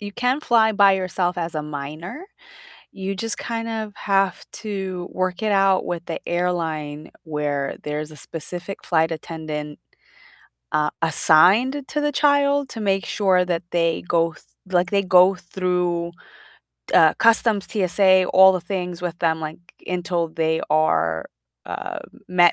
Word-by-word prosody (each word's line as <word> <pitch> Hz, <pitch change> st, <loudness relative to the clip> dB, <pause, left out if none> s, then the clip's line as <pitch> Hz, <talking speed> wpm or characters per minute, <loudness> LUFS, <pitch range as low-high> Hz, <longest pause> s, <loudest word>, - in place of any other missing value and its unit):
you 205 Hz, -1 st, -7 dB
can 250 Hz, +5 st, 0 dB
fly 225 Hz, -6 st, +3 dB
by 200 Hz, -2 st, +5 dB
yourself 185 Hz, -1 st, -1 dB
as 170 Hz, -1 st, -3 dB
a 155 Hz, -, -2 dB
minor, 150 Hz, -, -7 dB, 0.7 s
you 195 Hz, +1 st, -4 dB
just 225 Hz, +2 st, -3 dB
kind 230 Hz, -1 st, -4 dB
of 220 Hz, -2 st, -4 dB
have 195 Hz, -1 st, 0 dB
to 190 Hz, -4 st, -5 dB
work 185 Hz, +2 st, -2 dB
it 215 Hz, -, +1 dB
out 195 Hz, -1 st, +3 dB
with 170 Hz, -1 st, -4 dB
the 165 Hz, -, -4 dB
airline 160 Hz, -4 st, -2 dB
where 150 Hz, -3 st, -2 dB
there's 150 Hz, +1 st, -4 dB
a -, -, -12 dB
specific 175 Hz, +6 st, -6 dB
flight 160 Hz, -1 st, +2 dB
attendant, 155 Hz, -2 st, -6 dB, 1.0 s
uh, 150 Hz, 0 st, +2 dB
assigned 190 Hz, -, +4 dB
to 295 Hz, -, -2 dB
the 295 Hz, -, +1 dB
child 285 Hz, -1 st, +2 dB
to 225 Hz, -, -7 dB
make 195 Hz, -2 st, 0 dB
sure 185 Hz, -3 st, +2 dB
that 175 Hz, -1 st, -2 dB
they 165 Hz, -1 st, 0 dB
go 165 Hz, -1 st, +1 dB
th -, -, -19 dB, 0.3 s
like, 180 Hz, -1 st, +1 dB
they 200 Hz, -1 st, +3 dB
go 185 Hz, 0 st, +5 dB
through, 180 Hz, -1 st, -2 dB, 0.8 s
uh, 160 Hz, -1 st, +6 dB
customs, 225 Hz, -3 st, +3 dB
TSA, 190 Hz, -1 st, +3 dB
all 190 Hz, 0 st, +8 dB
the 185 Hz, -, -2 dB
things 180 Hz, -1 st, -4 dB
with 175 Hz, -2 st, -4 dB
them, 160 Hz, -1 st, +1 dB
like, 155 Hz, 0 st, -6 dB, 0.3 s
until 175 Hz, -2 st, -1 dB
they 160 Hz, 0 st, -1 dB
are, 85 Hz, -, +1 dB, 0.4 s
uh, -, -, -5 dB, 0.3 s
met 175 Hz, -1 st, +4 dB
180 Hz, 150 wpm, -22 LUFS, 160-200 Hz, 1.0 s, all